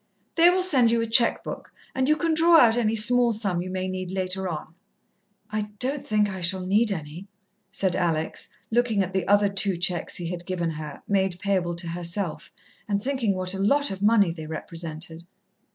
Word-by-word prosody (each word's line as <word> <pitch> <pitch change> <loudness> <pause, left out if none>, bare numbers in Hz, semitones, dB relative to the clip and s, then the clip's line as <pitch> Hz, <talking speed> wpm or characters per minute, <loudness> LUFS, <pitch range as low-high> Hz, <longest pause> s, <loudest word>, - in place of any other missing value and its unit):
"They 335 +1 +6
will 365 +1 +2
send 265 -10 +3
you 230 0 +2
a - - -1
cheque 230 +1 +3
book, - - -8 0.2
and 265 +1 0
you 305 - +5
can 330 0 0
draw 330 +1 +5
out 230 -6 +6
any 225 -2 +1
small 240 +2 +6
sum 200 -5 0
you 185 - -6
may 185 0 -3
need 185 -1 -5
later 190 0 -2
on." 160 -1 -7 0.8
"I 210 -1 -3
don't 270 +4 -1
think 210 -1 +1
I 190 -2 -6
shall 185 +2 -1
need 210 +4 +2
any," 165 +1 -6 0.4
said 190 -2 -1
Alex, 165 -3 -1 0.2
looking 230 -4 +2
at 185 0 -6
the 190 -2 -1
other 205 0 +4
two 195 -2 +1
cheques 175 0 -2
he 170 -1 -4
had 175 -1 -7
given 175 -3 -2
her, 150 -2 -8
made 190 -3 0
payable 185 -3 -1
to 170 0 -4
herself, 170 +1 -4 0.4
and 200 -2 0
thinking 240 -4 -1
what 185 0 -2
a 195 - -4
lot 280 +8 +2
of 190 0 -6
money 205 -4 +4
they 160 -2 -8
represented. 165 +1 -6
195 Hz, 200 wpm, -25 LUFS, 175-225 Hz, 0.8 s, They